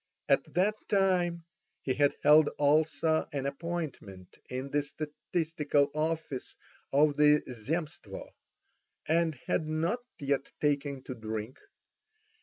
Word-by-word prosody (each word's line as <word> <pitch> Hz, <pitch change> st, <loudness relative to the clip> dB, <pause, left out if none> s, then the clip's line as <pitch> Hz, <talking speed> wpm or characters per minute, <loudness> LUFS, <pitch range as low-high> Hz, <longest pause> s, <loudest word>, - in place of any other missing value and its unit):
At -, -, +2 dB
that 190 Hz, +4 st, +3 dB, 0.2 s
time 180 Hz, -4 st, +2 dB, 0.4 s
he 130 Hz, -, 0 dB
had 145 Hz, +1 st, +2 dB
held 150 Hz, +1 st, +7 dB
also 155 Hz, +2 st, +2 dB
an 140 Hz, -2 st, -3 dB
appointment 140 Hz, -, -5 dB
in 130 Hz, +2 st, -4 dB
the 145 Hz, -, +2 dB
statistical 150 Hz, -1 st, -1 dB
office 155 Hz, -3 st, -2 dB, 0.4 s
of 145 Hz, +1 st, +4 dB
the 150 Hz, 0 st, +5 dB
Zemstvo, 150 Hz, -, -5 dB, 0.8 s
and 165 Hz, 0 st, +2 dB
had 155 Hz, -, 0 dB
not 165 Hz, +9 st, 0 dB, 0.2 s
yet 140 Hz, -1 st, -1 dB
taken 140 Hz, -2 st, 0 dB
to 130 Hz, -, -5 dB
drink. 110 Hz, +1 st, -5 dB
150 Hz, 110 wpm, -30 LUFS, 140-165 Hz, 0.8 s, held